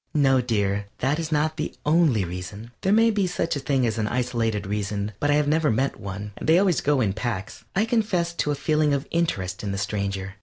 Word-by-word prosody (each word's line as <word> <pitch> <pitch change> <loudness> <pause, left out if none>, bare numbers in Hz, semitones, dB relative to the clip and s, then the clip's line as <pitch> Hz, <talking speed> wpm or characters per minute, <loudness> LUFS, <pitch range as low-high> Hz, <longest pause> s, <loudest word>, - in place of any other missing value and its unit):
No, 135 -3 +4
dear, 100 -4 0
that 140 +5 0
is 165 -1 -4
not 155 +1 +1
the 155 - -3
only 150 - +3
reason. 90 +6 -7
There 190 - +1
may 225 +2 +5
be 205 -3 +1
such 170 -2 -1
a - - -2
thing 135 -2 +1
as 115 -1 -1
an 105 - 0
isolated 115 -3 -1
reason, 100 +1 -2
but 145 - 0
I 145 - +4
have 150 -1 +2
never 155 0 +2
met 130 +3 0
one 100 0 -6
they 160 +2 +4
always 185 -3 +3
go 145 -2 +2
in 100 -5 +1
packs. 110 -2 -4
I 205 +4 +3
confess 210 -7 0
to - - 0
a 145 - +1
feeling 150 0 +2
of 140 - -3
interest 95 - -1
in 100 - -3
the 100 - -3
stranger. 100 -1 -3
130 Hz, 225 wpm, -24 LUFS, 105-155 Hz, -, may